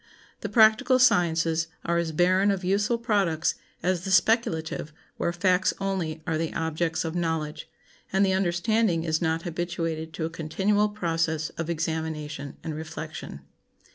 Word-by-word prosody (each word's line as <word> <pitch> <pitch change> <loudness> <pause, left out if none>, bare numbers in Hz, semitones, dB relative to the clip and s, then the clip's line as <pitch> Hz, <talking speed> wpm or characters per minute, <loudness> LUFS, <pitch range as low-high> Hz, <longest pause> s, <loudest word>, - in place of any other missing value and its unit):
The 205 - -4
practical 220 +4 +5
sciences 165 -8 +3 0.2
are 170 0 +1
as 170 -1 -1
barren 185 +5 +3
of 195 -2 0
useful 205 +5 +1
products 200 -9 +1 0.3
as 180 0 0
the 195 - -4
speculative 180 -7 +1 0.3
where 170 - 0
facts 180 +1 +2
only 175 -5 -2
are 160 -1 -1
the 165 -1 -1
objects 160 0 -1
of 160 - -3
knowledge, 160 -3 -2 0.4
and 195 +1 +3
the 190 - +2
understanding 190 0 +1
is 160 0 0
not 165 0 0
habituated 165 -2 -3
to 160 - -3
a - - -2
continual 190 +6 +1
process 165 -5 -1
of 165 0 -5
examination 160 -3 -3
and 160 - -4
reflection. 155 - -7
170 Hz, 145 wpm, -26 LUFS, 160-195 Hz, 0.4 s, practical